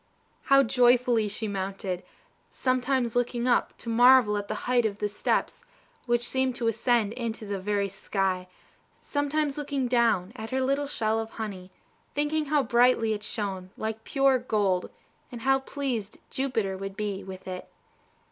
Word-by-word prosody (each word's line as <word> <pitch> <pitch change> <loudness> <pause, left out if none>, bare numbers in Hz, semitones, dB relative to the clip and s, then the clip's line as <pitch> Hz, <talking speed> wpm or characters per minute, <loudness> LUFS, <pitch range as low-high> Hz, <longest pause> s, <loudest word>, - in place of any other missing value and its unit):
How 275 0 +6
joyfully 245 -2 +3
she 215 +2 -2
mounted! 195 -2 -3 0.5
sometimes 255 -2 0
looking 245 0 0
up 245 - +1
to - - -12
marvel 240 -1 +6
at 205 0 -3
the 215 - -3
height 245 -1 +3
of 210 -2 -1
the 210 - -1
steps, 205 - -1 0.4
which 240 0 +1
seemed 260 -1 0
to 240 -3 -1
ascend 230 -1 +1
into 230 -3 -4
the 200 -1 -3
very 200 +1 0
sky, 190 -1 -2 0.5
sometimes 290 0 -1
looking 280 -3 -1
down 230 -5 +2
at 220 -1 -6
her 260 - -1
little 275 +2 0
shell 220 -4 0
of 225 0 -4
honey, 195 -5 -6 0.5
thinking 300 +1 0
how 290 -1 +2
brightly 235 -2 +3
it 210 - -4
shone, 195 -3 -3
like 220 0 -4
pure 270 0 +3
gold, 205 -6 0 0.4
and 240 -2 -7
how 270 +3 +3
pleased 260 -6 -4
Jupiter 230 -8 -1
would 195 0 -6
be 200 -2 -3
with 190 0 -9
it. 185 -1 -6
230 Hz, 155 wpm, -27 LUFS, 205-255 Hz, 0.5 s, How